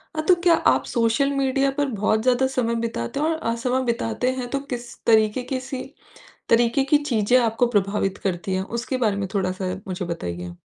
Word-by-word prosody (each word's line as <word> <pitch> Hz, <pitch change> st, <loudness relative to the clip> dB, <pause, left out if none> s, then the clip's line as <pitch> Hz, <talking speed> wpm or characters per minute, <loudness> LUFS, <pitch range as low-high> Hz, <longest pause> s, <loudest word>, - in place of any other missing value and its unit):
हाँ, 310 Hz, -, -1 dB
तो 365 Hz, -, +6 dB
क्या 345 Hz, -, +6 dB
आप -, -, +2 dB
सोशल 235 Hz, +4 st, +1 dB
मीडिया 275 Hz, 0 st, +1 dB
पर 285 Hz, +1 st, -1 dB
बहुत 215 Hz, -2 st, 0 dB
ज़्यादा 255 Hz, +1 st, +3 dB
समय 235 Hz, -2 st, +1 dB
बिताते 230 Hz, -, -3 dB
हैं 300 Hz, -, +1 dB
और 325 Hz, -, +1 dB
अ, 230 Hz, -6 st, -1 dB
समय 250 Hz, +2 st, 0 dB
बिताते 235 Hz, +1 st, -1 dB
हैं 245 Hz, -, -3 dB
तो 275 Hz, -, -1 dB
किस 240 Hz, -1 st, -5 dB
तरीके 220 Hz, +2 st, +3 dB
की 260 Hz, 0 st, -3 dB
सी 260 Hz, 0 st, -5 dB, 0.7 s
तरीके 235 Hz, +3 st, +3 dB
की 290 Hz, +2 st, +4 dB
चीज़े 240 Hz, -2 st, +2 dB
आपको 235 Hz, 0 st, +2 dB
प्रभावित 200 Hz, -2 st, 0 dB
करती 185 Hz, 0 st, -2 dB
है, 190 Hz, -, -1 dB
उसके 235 Hz, +5 st, -3 dB
बारे 220 Hz, -5 st, +1 dB
में 195 Hz, -, -2 dB
थोड़ा-सा 185 Hz, -1 st, -1 dB
मुझे 180 Hz, -1 st, -4 dB
बताइए? 90 Hz, -, -5 dB
235 Hz, 195 wpm, -23 LUFS, 200-260 Hz, 0.7 s, तो